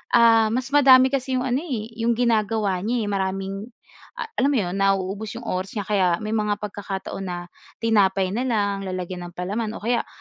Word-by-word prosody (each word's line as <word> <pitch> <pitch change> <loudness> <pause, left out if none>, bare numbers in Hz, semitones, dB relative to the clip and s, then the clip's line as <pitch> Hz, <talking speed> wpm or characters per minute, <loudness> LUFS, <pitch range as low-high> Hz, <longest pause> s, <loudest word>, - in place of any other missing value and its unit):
ah, 225 -2 +6
mas 255 +4 -2
madami 260 -2 +7
kasi 265 -1 -1
'yong 250 - 0
ano 255 +1 0
eh 235 -9 -4
'yong 230 0 +2
ginagawa 215 -5 +1
niya 225 +3 -1
eh 205 - -3
maraming, 195 +2 -2 0.5
ah, 450 - -5
alam 280 +2 +3
mo - - +2
'yon, 180 +2 -4
nauubos 195 +2 0
'yong 240 - -7
oras 185 +4 -3
niya 205 - -1
kaya 195 -3 +2 0.2
may 215 - -3
mga 210 -2 +1
pagkakataon 195 -1 -5
na 175 -1 -3 0.5
tinapay 195 -4 +3
na 250 +5 -1
lang, 200 -4 0
lalagyan 180 -1 -5
ng 175 - -14
palaman 210 +5 -3
o - - -9
kaya, 235 0 0
210 Hz, 195 wpm, -23 LUFS, 195-235 Hz, 0.5 s, madami